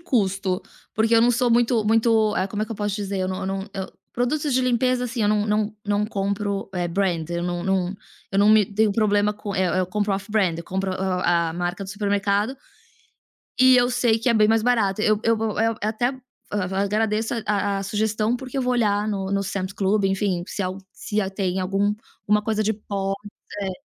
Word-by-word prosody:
custo, 195 Hz, -, 0 dB, 0.3 s
porque 225 Hz, +2 st, +2 dB
eu 225 Hz, -, +6 dB
não 240 Hz, -, +5 dB
sou 245 Hz, +1 st, +1 dB
muito 235 Hz, -1 st, +3 dB
muito 220 Hz, -1 st, +3 dB
eh, 185 Hz, -, +1 dB
como 205 Hz, +2 st, -3 dB
é -, -, +1 dB
que 230 Hz, -, -5 dB
eu -, -, -7 dB
posso 205 Hz, -1 st, -2 dB
dizer? 200 Hz, -2 st, -3 dB
Eu 185 Hz, -, -1 dB
não 185 Hz, 0 st, -3 dB
eu -, -, -3 dB
não 195 Hz, 0 st, -2 dB
eu 190 Hz, -1 st, -5 dB, 0.2 s
produtos 285 Hz, +4 st, 0 dB
de 255 Hz, -, +3 dB
limpeza, 250 Hz, 0 st, +1 dB
assim, 235 Hz, -1 st, -2 dB
eu 205 Hz, -, +3 dB
não 210 Hz, 0 st, +2 dB
não 210 Hz, 0 st, 0 dB
não 205 Hz, 0 st, +1 dB
compro, 200 Hz, -1 st, -2 dB
eh, 175 Hz, -1 st, -1 dB
brand, 170 Hz, -3 st, -1 dB
eu 170 Hz, 0 st, -2 dB
não 175 Hz, 0 st, -2 dB
não 190 Hz, -1 st, 0 dB, 0.4 s
eu 195 Hz, -, 0 dB
não 205 Hz, +1 st, +5 dB
me 215 Hz, -1 st, +6 dB
tenho 210 Hz, +1 st, +1 dB
problema 205 Hz, -1 st, +2 dB
com 205 Hz, -1 st, -6 dB
eh 190 Hz, -, +1 dB, 0.2 s
eh, -, -, +3 dB
eu 180 Hz, -, 0 dB
compro 205 Hz, +1 st, -1 dB
off 195 Hz, +2 st, -4 dB
brand, 190 Hz, -6 st, +1 dB
eu 170 Hz, -, -7 dB
compro 190 Hz, +2 st, -2 dB
o -, -, -2 dB
a 180 Hz, -3 st, 0 dB
marca 175 Hz, +3 st, -3 dB
do 190 Hz, -, -7 dB
supermercado 205 Hz, +4 st, 0 dB, 1.0 s
e 260 Hz, 0 st, +7 dB
eu 245 Hz, 0 st, +3 dB
sei 240 Hz, -2 st, +2 dB
que 230 Hz, -, -1 dB
é 235 Hz, -, +3 dB
bem 215 Hz, -1 st, +4 dB
mais 225 Hz, 0 st, +3 dB
barato. 215 Hz, -4 st, +1 dB
Eu 215 Hz, -1 st, +3 dB
eu 230 Hz, 0 st, +3 dB
vou 220 Hz, -1 st, -2 dB
eh, 225 Hz, 0 st, +2 dB
até 220 Hz, +3 st, 0 dB, 0.4 s
a 195 Hz, -1 st, -1 dB
agradeço 215 Hz, +2 st, 0 dB
a 205 Hz, -1 st, 0 dB
a -, -, -1 dB
a -, -, -3 dB
sugestão, 215 Hz, +3 st, 0 dB
porque 260 Hz, +1 st, -8 dB
eu 265 Hz, -, +1 dB
vou 250 Hz, -, +1 dB
olhar 210 Hz, -3 st, +1 dB
no 195 Hz, -2 st, -2 dB
no 200 Hz, 0 st, +1 dB
Sam's 190 Hz, 0 st, -3 dB
Club, 200 Hz, +1 st, +1 dB
enfim, 195 Hz, -2 st, 0 dB
se 200 Hz, -, -4 dB
al 185 Hz, +1 st, -3 dB
se, 210 Hz, 0 st, -2 dB
ah, 195 Hz, -, -1 dB
tem 190 Hz, -1 st, -1 dB
algum 195 Hz, +2 st, +1 dB, 0.3 s
alguma 210 Hz, 0 st, +2 dB
coisa 215 Hz, 0 st, 0 dB
de 215 Hz, -, +1 dB
pó, 200 Hz, -2 st, -3 dB, 0.5 s
eh, 195 Hz, -1 st, -2 dB
205 Hz, 230 wpm, -23 LUFS, 195-220 Hz, 1.0 s, e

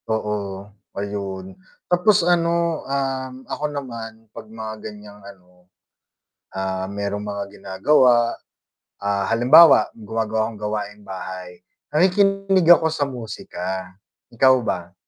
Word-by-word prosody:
Oo. 105 Hz, -3 st, -3 dB, 0.3 s
Ayun, 100 Hz, -2 st, -5 dB, 0.3 s
tapos 180 Hz, +4 st, +4 dB
ano, 170 Hz, -1 st, +1 dB
um, 135 Hz, -1 st, -2 dB
ako 150 Hz, -, -3 dB
naman 115 Hz, -5 st, -7 dB
'pag -, -, -8 dB
mga 110 Hz, 0 st, -7 dB, 0.2 s
ganiyang 105 Hz, -1 st, -14 dB
ano, 90 Hz, -2 st, -17 dB, 0.8 s
ah, 95 Hz, 0 st, -3 dB
mayrong 100 Hz, 0 st, -3 dB
mga 100 Hz, -1 st, -5 dB
ginagawa, 120 Hz, +4 st, +3 dB, 0.6 s
ah, 100 Hz, -1 st, -1 dB
halimbawa 125 Hz, +3 st, +6 dB
gumagawa 110 Hz, 0 st, -2 dB
akong 110 Hz, -, -10 dB
gawaing 105 Hz, 0 st, -4 dB
bahay, 95 Hz, -1 st, -8 dB, 0.3 s
nakikinig 195 Hz, +2 st, +3 dB
ako 160 Hz, -1 st, +2 dB
sa 155 Hz, -2 st, -1 dB
musika. 95 Hz, -7 st, -6 dB, 0.4 s
Ikaw 130 Hz, +2 st, +5 dB
ba? 85 Hz, -1 st, -3 dB
110 Hz, 105 wpm, -22 LUFS, 100-135 Hz, 0.8 s, halimbawa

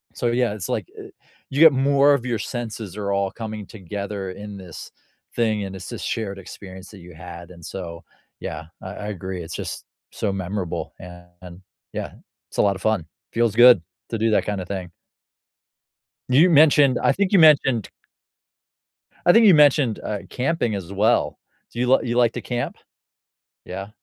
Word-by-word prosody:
so, 120 Hz, -, -1 dB
yeah, 120 Hz, -1 st, +1 dB
it's, 105 Hz, -5 st, -6 dB
like, -, -, -2 dB
eh, -, -, -9 dB, 0.4 s
you 135 Hz, -, -3 dB
get 160 Hz, -3 st, +9 dB
more 140 Hz, +2 st, +4 dB
of 135 Hz, -4 st, -1 dB
your 120 Hz, -2 st, -1 dB
senses 110 Hz, -4 st, -5 dB
are 100 Hz, -1 st, -2 dB
all 100 Hz, -1 st, 0 dB
coming 110 Hz, -3 st, -6 dB
together 100 Hz, 0 st, -6 dB
in 100 Hz, +2 st, -8 dB
this 90 Hz, -4 st, -10 dB, 0.4 s
thing, 110 Hz, -3 st, +1 dB
and 95 Hz, 0 st, -6 dB
it's 95 Hz, -1 st, -8 dB
this -, -, -6 dB
shared 100 Hz, -4 st, -3 dB
experience 95 Hz, 0 st, -11 dB
that 100 Hz, -, -12 dB
you 90 Hz, 0 st, -13 dB
had, 85 Hz, 0 st, -10 dB
and 85 Hz, -2 st, -13 dB
so, 85 Hz, -3 st, -7 dB, 0.4 s
yeah, 80 Hz, -, -6 dB, 0.2 s
I 95 Hz, -, -7 dB
I 105 Hz, -, -6 dB
agree. 95 Hz, -2 st, -5 dB
It's 80 Hz, -, -7 dB
just, -, -, -6 dB, 0.3 s
so 105 Hz, -, -2 dB
memorable, 95 Hz, -1 st, -4 dB
and, 90 Hz, 0 st, -13 dB, 0.3 s
yeah, -, -, -5 dB, 0.4 s
it's -, -, -12 dB
a -, -, +4 dB
lot 100 Hz, -1 st, +2 dB
of -, -, -9 dB
fun. 110 Hz, -7 st, +1 dB, 0.3 s
Feels 115 Hz, -2 st, +1 dB
good 120 Hz, -5 st, +8 dB, 0.3 s
to 115 Hz, -, -2 dB
do 115 Hz, +1 st, +2 dB
that -, -, +2 dB
kinda 100 Hz, -3 st, -2 dB
thing. 95 Hz, -2 st, -5 dB, 1.4 s
You 150 Hz, +8 st, +6 dB
mentioned, 145 Hz, -4 st, +5 dB
I -, -, +3 dB
think 200 Hz, 0 st, 0 dB
you 195 Hz, -, +5 dB
mentioned 140 Hz, -, +5 dB, 1.4 s
I 175 Hz, -, +8 dB
think 230 Hz, -1 st, +6 dB
you 195 Hz, -, +8 dB
mentioned, 145 Hz, -6 st, +4 dB
uh, 105 Hz, -1 st, -3 dB
camping 130 Hz, -3 st, -1 dB
as 95 Hz, -2 st, -5 dB
well, 105 Hz, +3 st, +2 dB, 0.4 s
do 120 Hz, -, -6 dB
you 125 Hz, +1 st, +4 dB
you 120 Hz, 0 st, -2 dB
like 120 Hz, -2 st, +4 dB
to -, -, -5 dB
camp? 120 Hz, -1 st, -3 dB, 0.9 s
Yeah. 95 Hz, +1 st, -6 dB
105 Hz, 175 wpm, -23 LUFS, 95-125 Hz, 1.4 s, get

